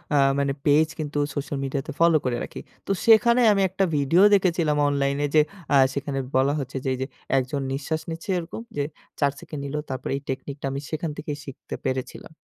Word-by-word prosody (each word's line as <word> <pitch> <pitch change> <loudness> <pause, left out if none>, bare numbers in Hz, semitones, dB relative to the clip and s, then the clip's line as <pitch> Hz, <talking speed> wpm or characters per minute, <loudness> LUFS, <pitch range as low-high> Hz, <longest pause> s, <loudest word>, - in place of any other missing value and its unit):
আ - - +5 0.2
মানে 140 -1 +1
পেজ 150 +2 +5
কিন্তু 150 -1 -3 0.2
সোশ্যাল 145 0 -3
মিডিয়াতে 135 0 -3
ফলো 165 -1 +5
করে 125 -2 0
রাখি। - - -7 0.3
তো - - 0
সেখানে 235 +2 +6
আমি 195 - +1
একটা 190 +2 0
ভিডিও 145 +6 +3
দেখেছিলাম, 170 -6 +2
অনলাইনে 140 0 +1
যে 155 - +8 0.3
আ - - +6 0.2
সেখানে 140 -1 -3 0.2
বলা 135 +2 +3
হচ্ছে 135 0 -5
যে, - - +1
এই - - -3
যে - - 0 0.3
একজন 135 +2 -1
নিঃশ্বাস 150 +4 -2
নিচ্ছে 165 +3 -7
এরকম 170 +6 -7 0.2
যে 145 - +1 0.4
৪ 140 -1 +3
সেকেন্ড 150 -2 -7
নিলো 145 +2 -3
তারপর 130 -1 -4
এই 140 - -4
টেকনিকটা 135 +2 -5
আমি 135 - -3
সেখান 160 +1 -2
থেকেই 150 -1 -4
শিখতে 135 - -8
পেরেছিলাম। 130 +4 -4
145 Hz, 190 wpm, -25 LUFS, 135-160 Hz, 0.4 s, যে